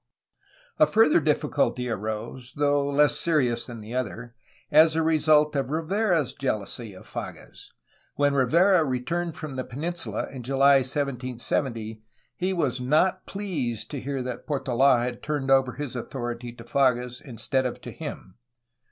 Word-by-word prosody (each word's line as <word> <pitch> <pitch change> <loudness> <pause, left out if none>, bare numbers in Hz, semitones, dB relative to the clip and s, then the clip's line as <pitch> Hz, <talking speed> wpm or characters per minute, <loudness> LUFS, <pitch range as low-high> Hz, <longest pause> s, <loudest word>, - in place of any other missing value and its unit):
A 310 - +7
further 220 -4 +5
difficulty 145 -4 0
arose, 110 +3 -5
though 145 -1 +2
less 145 0 +3
serious 125 -8 +1
than 120 -3 -8
the 110 +3 -9
other, 120 -1 -4 0.4
as 155 +1 +6
a 160 - +2
result 155 -1 +3
of 135 -2 -1
Rivera's 165 - +1
jealousy 110 -4 -3
of 95 - -13
Fages. - - -8 0.5
When 145 0 +2
Rivera 170 +7 +4
re 130 -4 -1
turned 170 +4 -3
from 155 -3 -6
the 130 -1 -3
peninsula 140 - -4
in 130 - -7
July 135 +2 +4
1770, 125 -4 -2 0.3
he 185 +2 -1
was 140 -9 -1
not 155 +8 +2
pleased 155 - -3
to 140 -4 -4
hear 135 -1 -3
that 125 -1 -6
Portola 135 -3 +3
had 120 -1 -4
turned 145 -3 -2
over 135 -2 +4
his 140 -3 -5
authority 120 -1 -5
to 120 -1 -12
Fages 125 -1 +1
instead 130 +1 -1
of 125 - -6
to - - -8
him. 95 +5 -8
135 Hz, 150 wpm, -26 LUFS, 120-150 Hz, 0.5 s, A